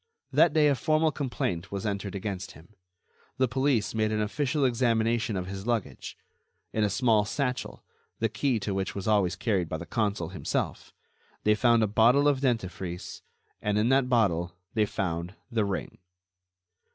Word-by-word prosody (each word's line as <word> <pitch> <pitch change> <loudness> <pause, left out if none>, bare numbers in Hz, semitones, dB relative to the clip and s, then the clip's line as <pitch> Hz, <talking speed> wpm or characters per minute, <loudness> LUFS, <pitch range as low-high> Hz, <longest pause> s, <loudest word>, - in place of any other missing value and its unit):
That - - +5
day, 155 -2 +5
a 145 - +4
formal 155 +5 +2
complaint 120 - -3
was 100 0 -4
entered 100 -1 -3
against 100 -1 -4
him. 80 +8 -17 0.6
The 130 - +3
police 130 -2 +1
made 110 -1 +1
an 110 - 0
official 140 +6 0
examination 115 -2 +1
of 90 - -3
his 95 +3 -6
luggage. 110 - -3 0.6
In 110 - +1
a 105 - +2
small 110 0 +3
satchel, 125 +4 -3 0.3
the 115 - +1
key 125 +1 0
to 100 - -2
which 95 -1 -2
was 100 0 -4
always 100 -5 +2
carried 95 -4 0
by 80 - -2
the 85 - -7
consul 100 -5 -1
himself, 90 - -3 0.5
they 105 - +4
found 115 +1 +4
a - - +2
bottle 120 +7 +4
of 140 -2 +2
dentifrice, 95 -8 -3 0.4
and 105 0 0
in 110 +3 +2
that 135 -1 +3
bottle 90 -8 +1 0.2
they 110 -2 +2
found 90 -1 -3 0.2
the 110 -3 +1
ring. 100 -1 -4
110 Hz, 165 wpm, -28 LUFS, 95-125 Hz, 0.6 s, That